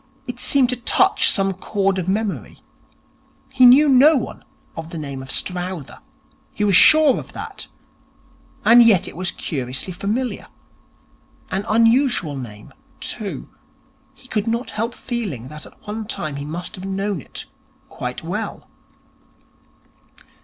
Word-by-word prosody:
It 250 -1 -7
seemed 265 -2 +3
to 250 - 0
touch 380 +10 +3
some 195 0 +2
chord 195 0 -1
of 180 - -4
memory. 205 +1 -2 0.9
He 260 -2 +6
knew 280 +5 +7
no 280 +3 +6
one 245 - -5 0.3
of 165 0 -7
the 170 - -7
name 140 -3 -6
of 130 - -11
Strowther. 180 -3 -4 0.5
He 210 - -3
was 200 -3 +4
sure 310 - +6
of - - -11
that. - - -7 1.0
And 240 +1 +8
yet 205 -6 +5
it - - -9
was 185 +1 -2
curiously 130 +4 -4
familiar. 215 +7 -3 1.0
An 195 +2 -2
unusual 230 - +3
name, 110 -6 -9 0.3
too. - - -5 0.7
He - - -16
could 215 0 -2
not 235 +2 -2
help 230 +3 -3
feeling 195 - -5
that 150 +1 -9
at - - -21
one 215 +1 -5
time 155 -9 -4
he 140 - -5
must 170 +4 -6
have 185 - -8
known 195 -2 -2
it - - -8 0.4
quite - - -6
well. - - -5
200 Hz, 140 wpm, -21 LUFS, 165-240 Hz, 1.0 s, And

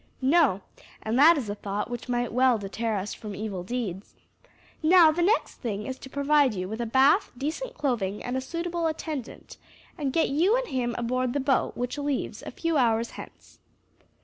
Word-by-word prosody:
"No; 270 - +4 0.4
and 220 +1 -1
that 325 +3 +7
is 255 -6 -3
a 205 - -2
thought 205 0 -4
which 240 +1 -7
might 240 -2 -1
well 255 -1 +4
deter 215 +2 -3
us 200 +1 -3
from 210 -2 -8
evil 200 -2 -4
deeds. 205 -3 -5 0.7
Now 330 0 +7
the 335 +3 -1
next 415 +7 +1
thing 210 -4 -4
is 260 0 -5
to 265 - -10
provide 280 -3 +2
you 185 -1 -3
with 220 +4 -5
a 235 - -2
bath, 275 - +4
decent 315 - -4
clothing, 220 -9 -2
and 255 +1 -2
suitable 335 +3 -2
attendant, 310 -5 -6 0.4
and 280 -3 -1
get 325 - +2
you 355 - +3
and - - -3
him 240 -2 -1
aboard 250 +1 -1
the 285 - 0
boat, 270 -1 0
which 245 +4 -3
leaves 285 -2 -2
a - - -7
few 330 -2 -1
hours 230 -2 +2
hence." - - -12
255 Hz, 185 wpm, -26 LUFS, 220-300 Hz, 0.7 s, that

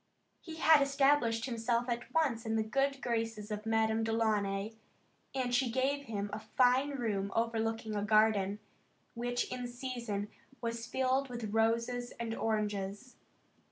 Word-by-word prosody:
He 325 -2 -8
had 315 -2 +6
established 275 -5 +3
himself 235 -1 0
at 240 0 -3
once 275 -8 +1
in 220 -1 -1
the 220 - +2
good 275 +4 0
graces 225 -3 -2
of 210 +1 -4
Madame 220 0 +2
Delaunay 215 -2 0 0.6
and 250 -2 -1
she 250 0 +3
gave 275 +4 0
him 205 -3 -3
a 210 - -3
fine 255 +5 +3
room 205 -6 -1
overlooking 225 -1 -1
a 205 - 0
garden, 210 -2 +3 0.6
which 245 +1 -1
in 250 -1 -3
season 240 -5 -4 0.3
was 230 -1 -4
filled 260 +2 +1
with 235 -4 -5
roses 230 +2 +1
and 230 -1 -2
oranges. 210 +1 -2
230 Hz, 140 wpm, -33 LUFS, 220-250 Hz, 0.6 s, had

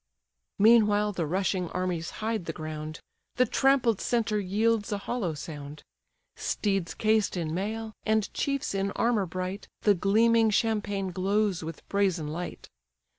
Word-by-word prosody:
Meanwhile 210 -1 +5
the 175 -5 -2
rushing 185 +1 0
armies 180 -3 -2 0.2
hide 220 -5 -1
the 165 - -3
ground; 155 0 -6 0.4
The 250 - +4
trampled 255 -3 +2
centre 225 -3 +1
yields 210 +3 +1
a 205 - 0
hollow 200 -6 -2
sound: 145 0 -8 0.5
Steeds 195 -5 -1
cased 215 -3 +2
in 160 -2 -2
mail, 220 +4 -3
and 220 -1 +1
chiefs 275 -4 -1
in 195 0 0
armour 225 -5 +1
bright, 185 +3 -4 0.2
The 205 - +6
gleaming 225 +4 +4
champaign 205 -3 0
glows 195 0 0
with 165 +1 -8
brazen 185 -6 0
light. 175 +3 -6
200 Hz, 135 wpm, -28 LUFS, 180-220 Hz, 0.5 s, The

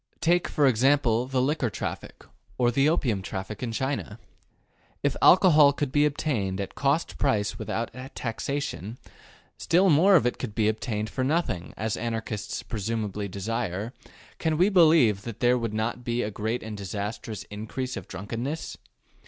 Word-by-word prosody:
Take, 175 +1 +2
for 145 - +2
example, 125 -1 +3
the 130 -1 0
liquor 140 -3 0
traffic, - - -6 0.3
or 120 -1 +3
the 135 +4 +3
opium 125 - 0
traffic 95 +1 -6
in 120 -2 -2
China. 130 -3 -3 0.9
If - - +1
alcohol 155 -6 +7
could 145 -1 -2
be 145 +1 +4
obtained 130 -11 -2
at 100 - -4
cost 140 +4 0
price 105 -7 0
without 115 +1 -3 0.2
taxation, 120 -2 -4 0.6
still 180 +2 +3
more 185 +7 +6
if 155 - +4
it 125 - -1
could 110 -5 -5
be 110 -2 +2
obtained 110 -1 -2
for 130 - -2
nothing, 135 - -1
as 110 0 -2
Anarchists 110 -3 -4
presumably 105 -2 -3
desire, 105 +2 -3 0.5
can 160 -2 0
we 180 +5 +4
believe 155 - +5
that 115 -1 -8
there 125 0 +4
would 115 -2 -2
not 110 +3 -2
be 120 0 -1
a 105 - -3
great 110 +4 -3
and 110 -1 -6
disastrous 105 +2 -5
increase 110 +5 -4
of 95 - -7
drunkenness? 115 - -5
120 Hz, 155 wpm, -26 LUFS, 105-145 Hz, 0.9 s, alcohol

